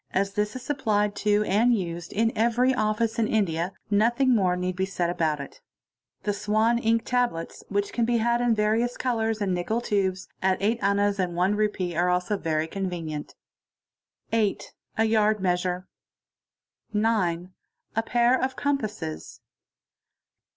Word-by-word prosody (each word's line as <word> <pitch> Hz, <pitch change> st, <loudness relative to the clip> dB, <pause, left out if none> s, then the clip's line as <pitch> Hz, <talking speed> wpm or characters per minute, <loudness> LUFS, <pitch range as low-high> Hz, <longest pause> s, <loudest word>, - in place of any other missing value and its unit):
this 210 Hz, +2 st, -1 dB
is 255 Hz, -, -6 dB
supplied 215 Hz, -7 st, 0 dB
to 210 Hz, 0 st, +2 dB
and 225 Hz, +5 st, +3 dB
used 170 Hz, -2 st, -5 dB
in 225 Hz, +2 st, +1 dB
every 240 Hz, +3 st, +3 dB
office 220 Hz, 0 st, 0 dB
in 220 Hz, -, +2 dB
India, 180 Hz, -5 st, 0 dB, 0.2 s
nothing 240 Hz, +5 st, +3 dB
more 185 Hz, -4 st, +2 dB
need 180 Hz, 0 st, -2 dB
b 190 Hz, -, -1 dB
said 180 Hz, -3 st, -1 dB
about 155 Hz, -4 st, 0 dB
it. 140 Hz, -, -9 dB, 0.6 s
The 205 Hz, -, 0 dB
'Swan' 220 Hz, +3 st, +1 dB
Ink 230 Hz, -1 st, +1 dB
tablets, 245 Hz, -10 st, -1 dB
which 205 Hz, 0 st, -1 dB
can 235 Hz, -, +1 dB
be 235 Hz, +1 st, +2 dB
had 235 Hz, +1 st, +1 dB
in 240 Hz, -2 st, +3 dB
variou 220 Hz, +3 st, +1 dB
colours, 225 Hz, -4 st, 0 dB
in 190 Hz, -2 st, 0 dB
Nickel 180 Hz, +6 st, -1 dB
tubes, 195 Hz, -5 st, -1 dB
at 190 Hz, 0 st, +2 dB
8 220 Hz, +4 st, +1 dB
as. 200 Hz, 0 st, +2 dB
and 175 Hz, -2 st, -1 dB, 0.2 s
Re. 215 Hz, 0 st, +3 dB, 0.2 s
1 -, -, -6 dB
are 175 Hz, +1 st, +2 dB
also 180 Hz, +3 st, +1 dB
very 160 Hz, -4 st, -1 dB
convenient. 165 Hz, -5 st, -4 dB, 1.0 s
8. 215 Hz, -3 st, 0 dB, 0.2 s
A 220 Hz, -, +3 dB
yard 215 Hz, -1 st, +3 dB
measure. 180 Hz, 0 st, -1 dB, 0.6 s
| -, -, -53 dB
9. 185 Hz, -5 st, 0 dB, 0.4 s
A 225 Hz, -, +2 dB
pair 240 Hz, +2 st, +2 dB
of 260 Hz, 0 st, -1 dB
compasses. 215 Hz, -, -3 dB
210 Hz, 150 wpm, -26 LUFS, 180-230 Hz, 1.0 s, and